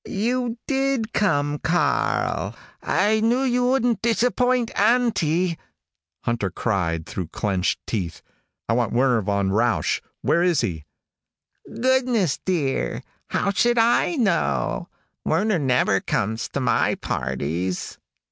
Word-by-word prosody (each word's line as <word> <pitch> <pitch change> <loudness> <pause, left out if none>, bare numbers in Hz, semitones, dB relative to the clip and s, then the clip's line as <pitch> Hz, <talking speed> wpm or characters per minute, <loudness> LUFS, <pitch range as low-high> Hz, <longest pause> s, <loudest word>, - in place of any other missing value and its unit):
"You 240 +3 -1
did 270 -4 0
come, 145 -7 +1
Karl! 175 +2 0 0.3
I 215 +1 +2
knew 235 +4 +2
you 245 -1 +1
wouldn't 245 -4 +1
disappoint 245 +1 +1
Auntie." 180 -9 +2 0.6
Hunter 115 -5 -1
cried 85 -5 -1
through 90 -3 -5
clenched 95 +1 -1
teeth, 90 -8 -4 0.4
"I 115 - +1
want 120 -1 0
Werner 125 -1 +3
von 100 -1 0
Rausch. 115 -1 +1 0.2
Where 170 - +2
is 175 -2 +3
he?" 85 -10 -3 0.8
"Goodness, 245 - +1
dear, 160 -8 -1 0.2
how 200 - 0
should 240 +4 +2
I 235 +9 +3
know? 170 - 0 0.3
Werner 210 -3 +1
never 125 -8 +2
comes 110 +4 -2
to - - -3
my 125 - +2
parties." 75 +8 -3
170 Hz, 115 wpm, -23 LUFS, -, 0.8 s, Werner